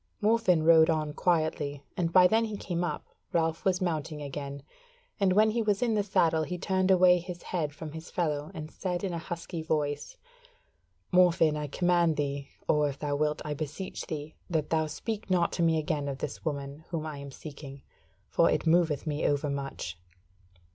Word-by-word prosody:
Morfinn 210 -6 +3
rode 160 0 +7
on 155 -2 0
quietly, 155 -5 0
and 165 -2 0
by 180 +1 +7
then 225 +5 +4
he 215 -2 -4
came 175 -3 -2
up, 175 - -3 0.3
Ralph 165 -1 +1
was 185 -1 +1
mounting 155 -3 -2
again, 140 -1 -6 0.6
and 195 -2 +3
when 215 +2 +5
he 235 +1 0
was 210 0 +1
in 235 -2 +2
the 210 - +2
saddle 165 -5 +2
he 155 +4 -3
turned 190 +1 0
away 180 -1 +6
his 175 0 -8
head 160 -5 -2
from 155 +1 -8
his 160 +2 -8
fellow 150 -4 -1
and 155 0 -6
said 180 -1 -3
in 190 -3 -2
a 170 - -2
husky 170 0 -5
voice: 145 -2 -2 1.0
"Morfinn, 170 -4 +5
I 150 -1 -3
command 175 +1 +2
thee, 140 -1 -2 0.2
or 150 -1 +3
if 140 - -6
thou 145 -1 -2
wilt 150 +1 0
I 150 - -2
beseech 155 +6 -5
thee, 155 -2 -5 0.2
that 160 -4 -1
thou 160 -1 +2
speak 210 +7 -5
not 180 -2 +2
to - - -2
me 165 -1 +3
again 150 -2 -1
of 140 -1 -3
this 140 - -5
woman 140 -1 -4
whom 165 -2 -3
I 150 -2 -5
am 140 0 -7
seeking; 140 -1 -10 0.4
for - - +3
it - - 0
moveth 160 -3 +3
me 150 -1 0
over 145 0 0
much." 135 -11 -5
160 Hz, 190 wpm, -29 LUFS, 145-180 Hz, 1.0 s, rode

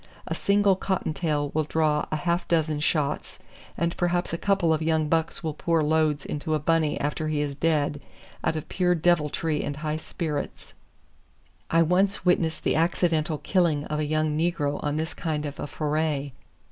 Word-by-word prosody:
A - - -3
single 200 -1 +3
cottontail 155 -6 -1
will 155 - +2
draw 150 -1 +1
a - - +1
half 170 +3 -1
dozen 155 -3 +1
shots 150 -2 -1 0.4
and 170 0 0
perhaps 175 -1 0
a - - 0
couple 195 -5 +2
of 155 - -1
young 160 -1 +1
bucks 165 +1 0
will 160 -2 -2
pour 165 +1 +1
loads 155 -1 +1
into 155 +1 -2
a - - 0
bunny 155 0 +1
after 150 +2 -2
he 155 -1 0
is 145 -1 -1
dead 145 -1 0 0.4
out - - +1
of 155 - -4
pure 180 -1 +1
deviltry 160 -2 +1
and 145 - -4
high 155 0 -2
spirits. 155 -2 -5 1.0
I 165 0 +4
once 190 +4 +1
witnessed 165 -3 +2
the - - +1
accidental 160 -1 +1
killing 160 -5 +1
of 150 0 -3
a 155 - 0
young 155 0 0
negro 155 -3 0
on 145 0 -1
this 160 +1 -2
kind 155 -2 -2
of 145 -1 -6
a - - -3
foray. 150 -2 -1
155 Hz, 175 wpm, -26 LUFS, 150-170 Hz, 1.0 s, I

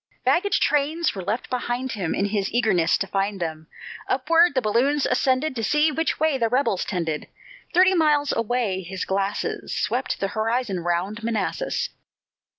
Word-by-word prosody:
Baggage 400 +4 +2
trains 300 +3 +1
were 195 - -5
left 210 +7 -3
behind 250 +1 -2
him, 190 -8 -2
In 200 - 0
his 200 -1 -1
eagerness 200 -9 +2
to - - -2
find 195 +1 -2
them; 160 -2 -4 0.4
Upward 330 +4 +3
the 260 - +3
balloons 260 +7 +2
ascended, 260 +3 +1
To 225 - -3
see 300 +8 +3
which 325 +3 -1
way 310 -3 +2
the 230 -1 +1
rebels 250 -6 +1
trended; 165 -5 -3 0.4
Thirty 370 +2 +5
miles 300 -4 +2
away 230 -4 -1
his 185 +1 -5
glasses 195 +1 -2
Swept - - -1
the 195 - -1
horizon 220 -1 -1
round 175 +6 -2
Manassas. 230 - -1
230 Hz, 155 wpm, -24 LUFS, 195-285 Hz, 0.4 s, Thirty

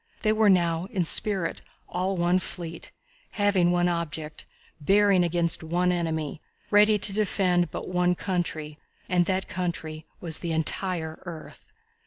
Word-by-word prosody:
They 215 -1 +3
were 215 -1 +4
now, 170 -2 +2
in 190 -7 -1
spirit, 190 0 0 0.3
all 185 +2 -2
one 175 +1 +2
fleet, 170 -2 -6 0.4
having 200 -4 +2
one 175 0 +2
object, 160 -3 -4 0.3
bearing 195 +3 +4
against 170 -1 0
one 175 +3 +1
enemy, 160 -3 -2 0.3
ready 210 +1 +6
to 200 0 +4
defend 185 -4 +1
but - - -6
one 180 0 +1
country, 165 -5 -3 0.3
and 175 -1 +2
that 190 0 -1
country 160 -3 -4
was 165 -3 -2
the 170 -2 -3
entire 160 0 -2
earth. 165 -3 -10
175 Hz, 140 wpm, -26 LUFS, 165-190 Hz, 0.4 s, ready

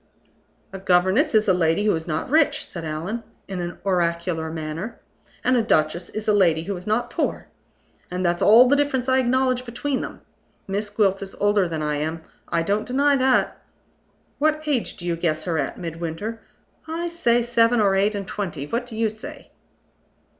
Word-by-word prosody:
"A 195 - -6
governess 190 - +3
is 215 0 +4
a 190 - +5
lady 175 +3 +2
who 210 - +4
is 160 +1 -3
not 155 -1 -2
rich," 295 +2 +2
said 170 - -8
Allan, 165 +9 -4 0.3
in 190 -2 -4
an 175 0 -5
oracular 170 -3 0
manner; 160 +7 -5 0.4
"and 255 - +3
a 240 - +4
duchess 170 -4 +1
is 215 0 -6
a 210 - +4
lady 170 -6 +3
who 200 +3 -3
is 180 +2 -9
not 215 +3 0
poor. - - -2 0.6
And 180 +1 -2
that's 175 0 +1
all 230 +4 +7
the 285 - +4
difference 280 -3 0
I 260 0 +3
acknowledge 255 0 +1
between 255 +3 -3
them. - - -7 0.5
Miss 205 +2 -2
Gwilt 200 -2 +1
is 195 -1 -7
older 205 -2 +2
than 160 -2 -3
I 150 -1 -1
am 160 +2 -3 0.2
I 165 - 0
don't 200 +4 -1
deny 280 +3 +3
that. 260 0 +2 0.8
What 310 +1 +1
age 280 -6 -1
do 175 - -8
you 170 -1 0
guess 155 -2 -1
her 165 -3 -1
at, 140 - -3
Midwinter? 170 +6 -5 0.5
I 330 +2 -3
say, 240 -9 +1
seven 235 0 +3
or 200 -2 +3
eight 205 +2 +2
and 200 -1 -4
twenty. 175 -9 -4
What 235 - -3
do 225 -3 -8
you 225 0 +2
say?" 275 +7 -9
205 Hz, 190 wpm, -23 LUFS, 170-240 Hz, 0.8 s, all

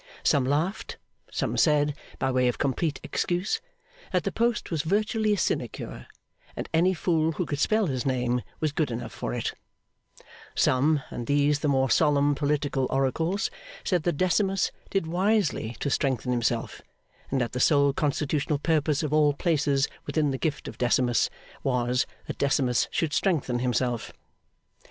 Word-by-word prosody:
Some 135 -3 +3
laughed; 155 +9 -1 0.3
some - - -2
said, 150 -2 +3 0.2
by 130 - 0
way 125 -1 +2
of 125 - 0
complete 140 +3 -1
excuse, 180 - -1 0.5
that - - +1
the - - -1
post 235 -3 0
was 160 -3 0
virtually 215 - +1
a - - 0
sinecure, - - -3 0.5
and - - -4
any 180 +3 +3
fool 160 -1 +1
who 180 - -2
could 145 -2 -3
spell 215 +5 +2
his 130 -7 -2
name 125 -2 0 0.2
was 155 -2 0
good 145 -1 0
enough 115 -2 -5
for - - -4
it; - - -2 1.0
some, 140 +2 +3
and 120 - -5
these 145 0 +3
the 150 - -1
more 135 -2 +2
solemn 145 -2 +4
political 145 -2 0
oracles, 160 - 0 0.3
said 180 -3 +1
that 170 -1 -1
Decimus 190 +1 +2 0.2
did 195 -4 0
wisely 180 - 0
to 140 - -1
strengthen 130 -3 0
himself, 120 -2 -1 0.5
and 135 - 0
that 120 -2 -1
the 125 - -3
sole 140 0 +4
constitutional 150 0 0
purpose 150 -1 +1
of 150 -1 -2
all 150 -1 +4
places 145 -3 +1 0.2
within 150 -3 +1
the 135 - -3
gift 150 -4 -2
of - - -9
Decimus, 120 0 +2 0.3
was, 125 -1 +1 0.2
that - - -6
Decimus 135 -3 +2
should 160 -3 -1
strengthen 145 -10 +1
himself. 125 -1 -1
145 Hz, 155 wpm, -27 LUFS, 130-165 Hz, 1.0 s, solemn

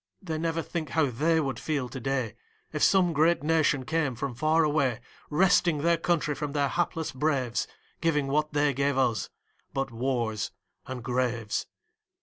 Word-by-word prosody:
They 160 -4 -4
never 165 0 -1
think 165 -3 -4
how 155 -5 +2
they 160 +7 +2
would 135 -6 -2
feel 145 -5 -1
to 130 - -7
day, 130 -3 -1 0.4
If - - -2
some 185 -3 +4
great 160 +1 +3
nation 150 -4 +2
came 155 -4 0
from 135 +2 -3
far 155 +6 +2
away, 140 -6 +1 0.3
Wresting 170 -2 +3
their 170 0 +4
country 165 -3 +1
from 145 0 -4
their 140 -2 +1
hapless 165 0 -1
braves, 130 -4 0 0.3
Giving 155 -4 +2
what 150 +2 0
they 145 -1 +2
gave 140 +1 0
us 125 -4 +1 0.5
but 135 -1 -1
wars 115 -3 -1 0.4
and 130 -2 -6
graves. 120 -3 -1
145 Hz, 160 wpm, -28 LUFS, 130-160 Hz, 0.5 s, some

